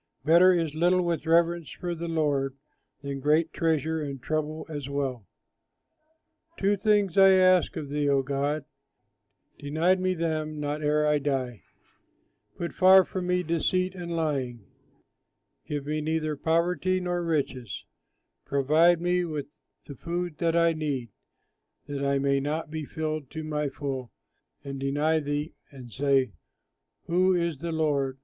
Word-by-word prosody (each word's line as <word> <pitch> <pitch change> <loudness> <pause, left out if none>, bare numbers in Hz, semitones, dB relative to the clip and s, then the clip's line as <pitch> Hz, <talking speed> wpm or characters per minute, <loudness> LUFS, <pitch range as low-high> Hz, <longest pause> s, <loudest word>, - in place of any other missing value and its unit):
Better 170 +4 +7
is 165 -4 0
little 175 +3 +2
with 170 -2 -2
reverence 170 0 +2
for 175 -1 -5
the 170 0 -5
Lord 145 -4 0 0.5
Than 140 -1 -4
great 155 +4 +2
treasure 160 -1 0
and 140 -2 -5
trouble 155 +3 -3
as 145 -4 -6
well. 135 -7 -3 1.3
Two 200 +1 +2
things 200 -2 +2
I 195 0 +8
ask 185 -2 +4
of 150 -3 -5
thee, 145 0 0
O 140 -1 +3
God, 140 +2 -2 0.9
Deny 160 +6 +2
me 185 0 0
them 155 -2 -2
not 150 +1 -3
ere 150 0 +2
I 150 0 +3
die: 130 - -2 1.0
Put 170 - -4
far 190 0 +7
from 185 -2 -4
me 180 0 +1
deceit 180 +3 0
and 175 -2 -5
lying, 135 -9 -2 1.0
Give 145 -2 -3
me 155 +1 -2
neither 155 0 -1
poverty 175 +4 +1
nor 175 -1 -2
riches; 135 - -2 0.6
Provide 155 +5 +3
me 180 +1 +1
with 150 -3 -5 0.3
the 140 - -8
food 170 +2 -4
that 165 -1 +1
I 170 0 +4
need, 140 -7 -3 0.7
That 140 -1 -4
I 140 0 +2
may 140 0 +1
not 150 +3 -3
be 155 -1 -4
filled 155 -3 -4
to 160 -1 -6
the 150 -1 -1
full 135 -4 -5 0.5
and 140 -1 -6
deny 145 +4 +1
thee, 145 +1 -3 0.2
And 130 -4 -12
say, 135 -1 +2 0.7
"Who 185 +2 +3
is 170 -4 -1
the 170 +2 -4
Lord?" 145 -4 0
155 Hz, 145 wpm, -27 LUFS, 140-170 Hz, 1.3 s, I